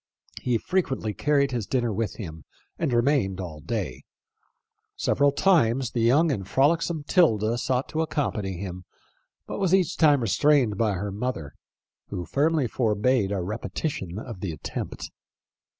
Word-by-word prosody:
He 125 Hz, -2 st, +1 dB
frequently 130 Hz, -, -1 dB
carried 140 Hz, 0 st, +2 dB
his 120 Hz, -5 st, -3 dB
dinner 120 Hz, -4 st, 0 dB
with 110 Hz, +1 st, -2 dB
him, 80 Hz, -, -8 dB, 0.4 s
and 160 Hz, -5 st, 0 dB
remained 120 Hz, -6 st, +2 dB
all 85 Hz, -5 st, -6 dB
day. 85 Hz, -, -4 dB, 0.9 s
Several 145 Hz, 0 st, +2 dB
times 135 Hz, -8 st, +2 dB
the 120 Hz, -, -1 dB
young 145 Hz, +8 st, +4 dB
and 95 Hz, -8 st, -3 dB
frolicsome 155 Hz, -, +2 dB
'Tilda 120 Hz, -, +3 dB
sought 130 Hz, +1 st, 0 dB
to 160 Hz, -, -1 dB
accompany 105 Hz, -, -2 dB
him, 90 Hz, -1 st, -6 dB, 0.6 s
but -, -, -5 dB
was 190 Hz, -2 st, +3 dB
each 185 Hz, -5 st, +1 dB
time 145 Hz, -4 st, +5 dB
restrained 125 Hz, 0 st, +3 dB
by 110 Hz, 0 st, +1 dB
her 100 Hz, +2 st, -3 dB
mother, 100 Hz, -, -4 dB, 0.5 s
who 90 Hz, -, -5 dB
firmly 145 Hz, -, +1 dB
forbade 110 Hz, -1 st, +1 dB
a 95 Hz, -3 st, -1 dB
repetition 105 Hz, -, -4 dB
of 110 Hz, -2 st, -7 dB
the 95 Hz, -2 st, -3 dB
attempt. 80 Hz, -, -6 dB
120 Hz, 145 wpm, -26 LUFS, 100-145 Hz, 0.9 s, time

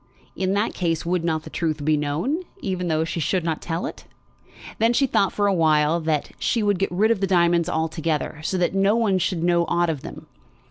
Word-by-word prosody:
In 190 Hz, 0 st, 0 dB
that 205 Hz, +3 st, 0 dB
case 165 Hz, -3 st, -1 dB
would 175 Hz, 0 st, 0 dB
not 160 Hz, -2 st, -1 dB
the -, -, -10 dB
truth 155 Hz, -3 st, -2 dB
be 155 Hz, 0 st, +3 dB
known, 150 Hz, -, -1 dB, 0.2 s
even 185 Hz, -, -3 dB
though 160 Hz, -1 st, +1 dB
she 165 Hz, +1 st, -3 dB
should 180 Hz, +3 st, 0 dB
not 160 Hz, -2 st, -2 dB
tell 165 Hz, 0 st, -3 dB
it? -, -, -8 dB, 0.7 s
Then 225 Hz, +2 st, +3 dB
she 275 Hz, -, +3 dB
thought 200 Hz, -6 st, +1 dB
for 205 Hz, -, 0 dB
a 200 Hz, -, +3 dB
while 155 Hz, -1 st, +3 dB
that 155 Hz, -3 st, -1 dB
she 230 Hz, -3 st, 0 dB
would 205 Hz, -3 st, +1 dB
get 195 Hz, -, 0 dB
rid 210 Hz, +6 st, +2 dB
of 225 Hz, -, +1 dB
the 195 Hz, -, +1 dB
diamonds 170 Hz, -2 st, +3 dB
altogether, 160 Hz, -1 st, -2 dB
so 185 Hz, -, -1 dB
that 180 Hz, 0 st, +1 dB
no 195 Hz, +2 st, +3 dB
one 210 Hz, -5 st, +2 dB
should 175 Hz, -2 st, -1 dB
know 175 Hz, 0 st, +3 dB
aught 175 Hz, -1 st, +1 dB
of 145 Hz, -4 st, -5 dB
them. -, -, -9 dB
175 Hz, 225 wpm, -23 LUFS, 160-195 Hz, 0.7 s, be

